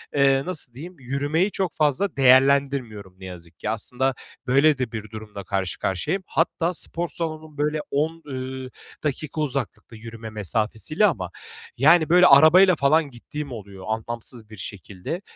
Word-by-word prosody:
eee, 135 -1 +4
nasıl 155 -9 -3
diyeyim, 170 +8 -9
yürümeyi 145 +9 0
çok 190 -3 -2
fazla 150 +6 +1
değerlendirmiyorum 130 -7 +3
ne 95 - -10
yazık 85 -2 -11
ki. 105 - -3
Aslında 125 +4 -1 0.3
böyle 140 +3 +4
de 125 -4 -3
bir 110 -2 -6
durumla 105 -2 -8
karşı 95 -3 -3
karşıyayım. 95 - -2
Hatta 170 +1 0
spor 170 0 -2
salonum, 155 -2 -6
böyle, 150 +1 0
10, 160 +3 -1
ııı, 130 -1 -6 0.3
dakika 155 +1 -3
uzaklıkta, 135 -4 -4
yürüme 115 0 -9
mesafesiyle 110 - 0
ama, 100 - 0 0.5
yani, 160 +4 +5
böyle, 180 +1 +7
arabayla 165 +6 +7
falan 150 +1 +2
gittiğim 140 +4 -7
oluyor, 100 -4 -9
anlamsız 115 0 -4
bir 110 - -12
şekilde. 100 - -7
135 Hz, 145 wpm, -23 LUFS, 110-155 Hz, 0.5 s, böyle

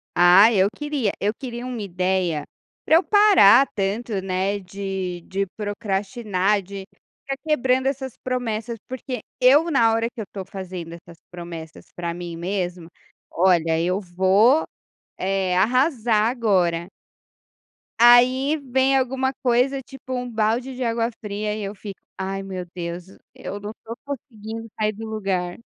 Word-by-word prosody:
Ah, 180 +5 +7
eu 195 -3 +4
queria 295 -8 -1
eu 205 +2 0
queria 245 -1 -7
uma 250 -3 -5
ideia, 180 -4 -1 0.4
para 315 - +5
eu 340 - +5
parar 375 - +6
tanto, 200 +1 -2
né, 190 +2 -1
de 190 -2 -5
de 195 +1 -1
procrastinar, 205 -1 -1
de 195 +1 -8 0.4
estar 275 0 -4
quebrando 260 -4 +1
essas 265 -2 -3
promessas, 235 -2 -3
porque 255 -2 -5 0.2
eu 290 +7 +5
na 230 -6 +4
hora 225 0 +1
que 240 -1 -13
eu - - -2
estou 195 -1 -8
fazendo 180 -4 -7
essas 170 0 -13
promessas 170 -2 -9
para 170 -1 -3
mim 175 -1 -6
mesma, 175 -1 -3 0.4
"Olha 165 -3 +3
eu 180 +3 0
vou, 195 - +3 0.5
eh, 190 -1 0
arrasar 230 - +2
agora". 185 -9 +1 1.2
Aí 255 +4 +6
vem 270 -1 +1
alguma 265 0 0
coisa, 255 +2 +2
tipo, 260 0 -9
um 250 -1 -3
balde 230 +4 0
de 255 0 -3
água 230 0 0
fria, 210 0 -3
e 215 0 -4
eu 200 +1 -5
fico: 200 -1 -9 0.2
"Ai 195 +1 -3
meu 190 -2 -6
Deus, 175 0 -6 0.3
eu 205 - -6
não 205 +1 -7
tô 225 - -6
conseguindo 225 -5 -7
sair 215 0 +1
do 220 +2 -8
lugar". 195 -5 -3
210 Hz, 145 wpm, -23 LUFS, 185-250 Hz, 1.2 s, Ah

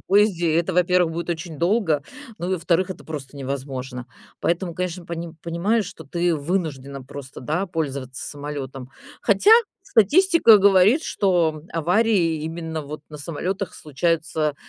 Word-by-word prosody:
поезде. 190 -5 +2
Это, 170 +3 +1
во-первых, 180 -1 +3
будет 170 +1 -4
очень 165 -2 -5
долго, 170 -4 +2 0.4
ну 175 - -3
и, 190 - +2
во-вторых, 175 +2 +1
это - - -8
просто 145 -3 -7
невозможно. 130 -2 -5 0.3
Поэтому, 170 0 -1
конечно, 180 -1 -4
пони 170 -1 -5
понимаешь, 195 +7 0
что 160 -5 -10
ты 170 +3 0
вынуждена 140 -4 -3
просто, 140 0 -9
да, 160 +9 -1
пользоваться 140 -6 -4
самолетом. 140 -3 -6 0.3
Хотя, 205 - +3 0.3
статистика 290 - +5
говорит, 200 - +5
что 170 - +1
аварии 170 -1 +2
именно 160 -1 -4
вот 150 +1 -7
на 150 - -8
самолетах 180 +6 -4
случаются, 155 0 -1
165 Hz, 135 wpm, -23 LUFS, 145-185 Hz, 0.4 s, статистика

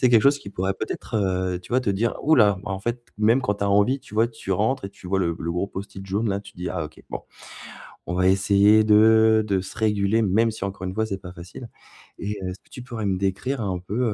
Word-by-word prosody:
C'est 125 - +5
quelque 115 -3 +5
chose 140 +1 +4
qui 100 - -10
pourrait 95 0 -2
peut-être, - - -6
heu, 95 -2 0
tu - - -16
vois 130 - +4
te 120 - 0
dire: 110 +4 0
«Oula» 105 -11 +4
bah, - - -6
en 95 - -2
fait 120 +4 -3 0.2
même 115 +4 +4
quand 105 -4 0
tu 100 - -2
as 100 - +1
envie 105 +7 +3
tu 105 - -14
vois, 110 +2 +4
tu 115 -4 -5
rentres 110 +6 0
et 100 - -5
tu 100 -2 -14
vois 95 +1 0
le 85 -3 0
le 85 +1 -3
gros 90 +3 -1
Post-it 95 0 -8
jaune, 105 +4 -1
là, 100 0 -1
tu 100 -1 -14
te - - -31
dis: 90 0 -3
«Ah, 85 -4 -3
OK. 75 - -12
Bon. - - -4 0.9
On 85 - -4
va 90 +1 +2
essayer 100 +3 +5
de 110 +1 +5
de 95 -3 0
se 95 - -10
réguler», 105 0 +2
même 110 +3 +3
si 110 - -6
encore 95 -1 -5
une 95 - -4
fois 110 +1 0
c'est 100 -3 -4
pas 90 -1 -9
facile. 90 +7 -10 0.5
Et, 105 0 -3
heu, 95 - -3
est-ce 90 - -8
que - - -31
tu 125 - -8
pourrais 115 -4 -5
me 95 -2 0
décrire 100 +7 -2
un 95 -3 -2
peu, 100 +6 -4
100 Hz, 270 wpm, -24 LUFS, 95-110 Hz, 0.9 s, C'est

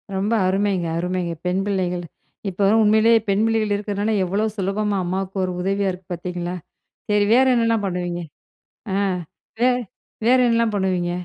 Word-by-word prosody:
ரொம்ப 205 +4 0
அருமைங்க 190 -2 0
அருமைங்க! 180 0 -2
பெண் 185 +2 +1
பிள்ளைகள். 180 -3 -1 0.5
இப்ப 195 +1 +1
உண்மையிலேயே 220 +2 +5
பெண் 200 +2 +2
பிள்ளைகள் 220 -2 +1
இருக்கிறதுனால 205 +1 -1
எவ்வளோ 200 +4 0
சுலபமா 200 +1 -1
அம்மாவுக்கு 190 +2 -3
ஒரு 185 - -1
உதவியா 195 +1 0
இருக்கு 180 0 -11
பார்த்தீங்களா! 175 0 -4 0.6
சரி 205 0 +3
வேறு 260 +1 +5
என்னலாம் 230 -3 +1
பண்ணுவீங்க? 175 -1 -3 0.7
ஆ - - +1 0.6
வே 250 +1 +4 0.6
வேற 255 +1 +6
என்னலாம் 230 -2 +2
பண்ணுவீங்க? 185 -3 0
195 Hz, 140 wpm, -22 LUFS, 180-215 Hz, 0.7 s, வேற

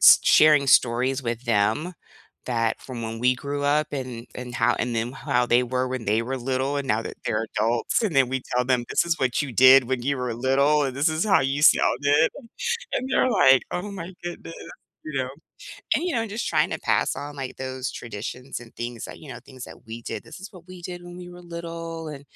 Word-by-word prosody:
s - - +9
sharing 150 -2 +6
stories 130 +2 +3
with 120 0 -3
them 115 - +1 0.5
that 115 -2 0
from 125 -3 -7
when 115 0 -5
we 125 +2 +3
grew 145 +2 -4
up 150 +1 +2
and 125 -4 -5
and 125 -1 -7
how 120 0 +2
and 120 -1 -1
then 115 +3 -2
how 135 -3 0
they 120 +1 +4
were 125 +1 -1
when 125 -4 -4
they 110 +2 +2
were 130 +3 -3
little 130 +3 -1
and 140 - -5
now 110 +1 +1
that - - -6
they're 105 +1 0
adults, 115 - +1
and 195 -10 -1
then 130 -2 +5
we 130 0 -1 0.2
tell 125 - +2
them, 125 -1 +1
"This - - +2
is 165 -2 0
what 130 +1 +1
you 135 - -5
did 130 +2 +7
when 130 0 -2
you 140 +2 0
were 125 -2 -2
little, 140 +4 +2
and 130 -1 -3
this 145 +4 +3
is 155 +3 0
how 195 - +5
you 135 +2 -1
sounded." 145 0 +4 0.6
And 255 - -1
they're 255 - +3
like, 135 - +5
"Oh 190 +4 -4
my 185 -1 -7
goodness," 175 -1 -7 0.5
you 150 -3 -3
know, 130 - -4 0.7
and, - - -1
you 360 - -1
know, 230 -1 0
just 215 +3 -4
trying - - +2
to - - -3
pass - - +1
on, 145 0 -7
like, 135 -2 -6
those 130 0 -4
traditions 120 +4 -6
and 120 -1 -15
things 120 -1 -5
that, - - -10
you 150 - -12
know, - - -7
things 130 -2 -11
that - - -14
we 115 +1 -7
did. - - -5
"This 160 - -11
is 195 +1 -9
what 180 -3 -15
we 185 -1 -11
did 175 0 -7
when 175 0 -10
we 180 0 -9
were 175 0 -12
little, 165 -1 -6
and 140 -2 -8
135 Hz, 230 wpm, -24 LUFS, 120-155 Hz, 0.7 s, s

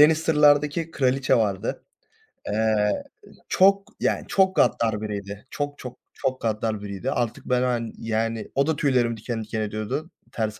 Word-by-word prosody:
Lannister'lardaki 150 0 +4
kraliçe 135 -2 +2
vardı. 100 -5 -1 0.6
Eee, 105 -1 +1 0.5
çok, 195 +1 +4
yani - - 0
çok 190 -1 +3
gaddar 115 -8 +2
biriydi. 100 +1 -6
Çok, 145 0 -4
çok, 125 -1 -8 0.2
çok 130 0 -2
gaddar 110 -1 -1
biriydi 100 +5 -4
artık, 120 -2 -2
ben, 125 0 +1
hani, 120 -2 -1
yani 115 0 -2
o 140 +1 +2
da 160 - +1
tüylerimi 125 -5 +1
diken 115 +1 -4
diken 110 0 -3
ediyordu. 110 +9 -3 0.2
Ters 110 -2 -3
120 Hz, 140 wpm, -24 LUFS, 110-145 Hz, 0.6 s, Lannister'lardaki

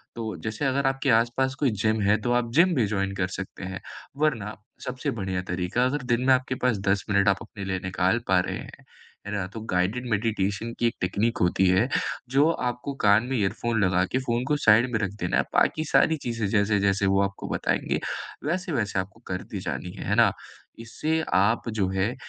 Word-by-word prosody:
तो 110 -2 -4
जैसे 110 +5 -3
अगर 135 +1 +1
आपके 135 +1 0
आस-पास 120 +4 +2
कोई 140 -5 +2
जिम 110 0 +2
है, 100 +1 +4
तो 120 - -1
आप 120 -1 0
जिम 175 +5 +5
भी 120 -6 +3
जॉइन 100 -1 -1
कर 90 -1 0
सकते 95 0 -7
हैं। 95 0 -5 0.4
वरना 120 -9 0 0.3
सबसे 125 0 -3
बढ़िया 95 -1 -2
तरीका 90 +7 0
अगर 135 +1 -1
दिन 120 - +1
में 130 - +7
आपके 130 0 0
पास 125 -4 +3
10 100 0 +2
मिनट 100 0 +3
आप 100 - +3
अपने 105 -3 -8
लिए 95 -1 -2
निकाल 95 +3 +1
पा 95 -1 +4
रहे 90 - -2
हैं, - - -11 0.4
है - - -4
ना? 100 -3 -1
तो 110 +3 -8
गाइडेड 105 +8 0
मेडिटेशन 105 +1 -1
की 120 - +3
एक 115 - -2
टेक्नीक 110 +7 0
होती 90 +2 +3
है, 95 +7 +3 0.4
जो 140 +5 +4 0.2
आपको 125 +3 -5
कान 105 +2 +6
में 135 - 0
इयरफोन 110 +2 0
लगा 90 -1 +3
के 130 - +1
फ़ोन 120 -2 -1
को 150 - +2
साइड 120 -2 +4
में 110 - +1
रख 100 -3 -1
देना - - +1
है, - - +3
बाकी 155 - +2
सारी 160 - +4
चीजें 115 -5 -3
जैसे-जैसे 100 -1 +2
वो 95 0 +3
आपको 100 0 -4
बताएँगे, - - 0 0.5
वैसे-वैसे 150 - -1
आपको 95 +3 -6
करती 95 +2 -5
जानी 90 - -4
हैं। - - -5
है 100 - +2
ना? 115 -3 +5 0.5
इससे 155 +8 -2
आप 110 +5 +2
जो 105 -4 0
है, 95 +5 -1
110 Hz, 205 wpm, -26 LUFS, 95-125 Hz, 0.5 s, में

